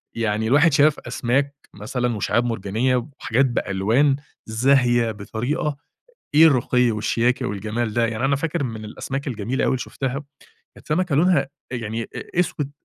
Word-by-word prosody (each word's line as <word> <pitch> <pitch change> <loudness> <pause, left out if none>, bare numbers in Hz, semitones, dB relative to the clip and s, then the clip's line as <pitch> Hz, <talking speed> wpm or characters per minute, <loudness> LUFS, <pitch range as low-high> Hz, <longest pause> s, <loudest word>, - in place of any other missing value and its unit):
يعني 110 -1 0
الواحد 145 +4 +4
شاف 150 +1 +4
أسماك 140 +4 -1 0.2
مثلًا 120 +3 -2
وشِعاب 120 +4 +1
مرجانيّة 115 +3 0 0.2
وحاجات 130 +5 +2
بألوان 120 +4 +1 0.3
زاهية 120 0 +3
بطريقة، 120 +8 -3 0.6
إيه 160 +2 +8
الرُّقي 125 -3 +3
والشياكة 120 +4 0
والجَمال 110 +2 -2
ده! 120 -1 +2
يعني 115 +3 -3
أنا 140 +1 +2
فاكر 160 +1 -2
من 110 -3 -5
الأسماك 135 +6 -5
الجميلة 120 +2 -2
أوي - - +2
اللي 130 - 0
شُفتها، 135 +2 -4 0.5
كانت - - -17
سمكة 165 0 +1
لونها 155 -2 +3 0.2
يعني 115 -1 -3
أ 175 - -4
أسوِد 145 -5 -2
125 Hz, 145 wpm, -22 LUFS, 110-140 Hz, 0.6 s, إيه